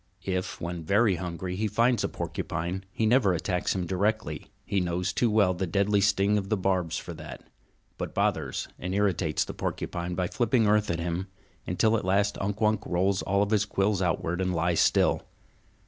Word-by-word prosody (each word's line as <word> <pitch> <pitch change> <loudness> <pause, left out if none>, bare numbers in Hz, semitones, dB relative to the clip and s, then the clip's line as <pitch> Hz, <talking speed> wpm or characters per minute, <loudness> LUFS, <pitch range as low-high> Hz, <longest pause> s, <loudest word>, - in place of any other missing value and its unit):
If, 95 -1 -2
when 85 0 -4
very 100 +3 +3
hungry, 90 +1 -4
he 110 +3 0
finds 115 +2 +2
a - - 0
porcupine, 90 +3 -4
he 110 - -1
never 110 -4 +4
attacks 90 +2 -1
him 90 -2 -1
directly, 105 +5 -1 0.2
he 100 - 0
knows 90 0 -1
too 120 - +2
well 105 -4 +3
the 90 +1 -2
deadly 100 +3 +2
sting 100 +1 +3
of 95 -1 -6
the 110 - +1
barbs 90 -3 0
for 85 - -6
that, 80 -1 -9 0.6
but - - -5
bothers - - 0
and 90 +1 -3
irritates 95 -6 +1
the - - -6
porcupine 85 0 -3
by 90 0 0
flipping 120 +3 +2
earth 105 0 +3
at 85 - -1
him, 85 +3 -2 0.4
until 110 +5 +2
at - - -4
last 100 +2 +2
Unk 100 +1 -2
Wunk 110 0 +2
rolls 95 +2 +1
all 100 +1 +1
his 105 -1 +2
quills 100 -1 0
outward 90 0 0
and 90 -1 0
lies 85 0 +1
still. - - +3
95 Hz, 185 wpm, -27 LUFS, 90-105 Hz, 0.6 s, never